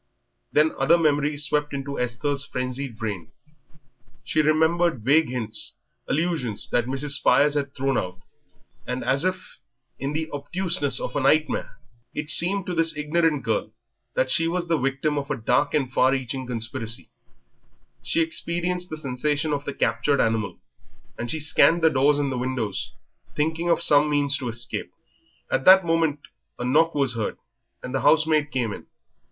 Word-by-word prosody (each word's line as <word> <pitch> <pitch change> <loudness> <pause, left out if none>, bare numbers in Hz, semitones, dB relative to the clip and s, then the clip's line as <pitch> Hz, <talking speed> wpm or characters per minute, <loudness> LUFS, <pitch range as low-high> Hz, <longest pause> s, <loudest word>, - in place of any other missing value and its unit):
Then 155 +1 +3
other 170 - +4
memories 150 -2 +1
swept 150 0 -1
into 140 0 -5
Esther's 135 +4 -2
frenzied 125 -2 -4
brain. 105 -7 -5 0.9
She 155 - +1
remembered 160 -3 +2
vague 150 +5 +3
hints, 115 -4 -4 0.3
allusions 150 - 0
that 120 -1 +1
Mrs. 135 +2 -1
Spires 140 +1 +3
had 140 -1 -3
thrown 135 0 0
out; 90 0 -6 0.7
and 125 +1 -3
as 135 +3 +1
if 185 0 -4 0.4
in 140 +2 -3
the 160 +1 -2
obtuseness 145 -1 -1
of - - -5
a - - +1
nightmare, 150 +3 +1 0.4
it 150 +1 0
seemed 185 +3 +5
to 180 - -4
this 165 -2 +1
ignorant 150 -1 +1
girl 110 -1 -2 0.4
that 130 0 +1
she 165 +5 +3
was 175 +1 -2
the 165 -1 +1
victim 135 +3 -1
of 140 - -7
a 145 - -1
dark 125 +6 +1
and 130 -4 -1
far 130 +1 +4
reaching 130 -1 -4
conspiracy; 115 -1 -4 0.9
she 165 - 0
experienced 175 +2 -1
the 155 - -5
sensation 145 +2 -1
of 145 0 -3
the 140 - -4
captured 145 -1 +1
animal, 110 -5 0 0.6
and 120 - -5
she 160 - -1
scanned 165 +2 +3
the 160 - +5
doors 140 +1 +3
and 135 -3 -1
windows, 125 -7 -3 0.4
thinking 160 +3 -1
of 170 - +2
some 150 -2 +4
means 140 -1 +1
of 125 - -3
escape. 120 +1 -4 0.6
At - - +1
that 190 -1 +8
moment 165 -3 +1 0.4
a 120 - -4
knock 160 +6 +2
was 135 -4 +2
heard 115 -2 -3 0.5
and 125 - -6
the 135 - 0
housemaid 155 0 +3
came 120 -7 -2
in. - - -10
145 Hz, 160 wpm, -24 LUFS, 130-160 Hz, 0.9 s, that